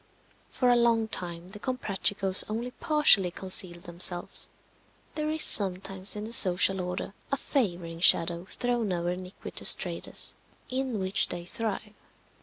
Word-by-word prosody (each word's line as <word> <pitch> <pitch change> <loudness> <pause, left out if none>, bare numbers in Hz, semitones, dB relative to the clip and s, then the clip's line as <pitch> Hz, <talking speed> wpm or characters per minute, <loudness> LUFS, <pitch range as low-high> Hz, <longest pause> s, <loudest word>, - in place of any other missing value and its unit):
For 250 - -1
a 245 - +3
long 230 -2 +1
time 175 -2 -5
the 210 - -11
Comprachicos 200 -5 0
only 235 +3 -5
partially 295 - +2
concealed 180 -1 0
themselves. 175 +1 -2 0.6
There 305 0 -4
is 315 0 +3
sometimes 190 0 +5
in 210 - -7
the 225 +2 -7
social 190 -2 +3
order 180 +2 -7 0.2
a 275 - -1
favouring 175 - -4
shadow 170 0 +2
thrown 240 -1 -4
over 175 0 -3
iniquitous 180 +1 +2
trades, - - -2 0.4
in 255 -4 -3
which 190 +1 +4
they 175 -1 -7
thrive. 215 +1 -6
195 Hz, 135 wpm, -26 LUFS, 180-235 Hz, 0.6 s, sometimes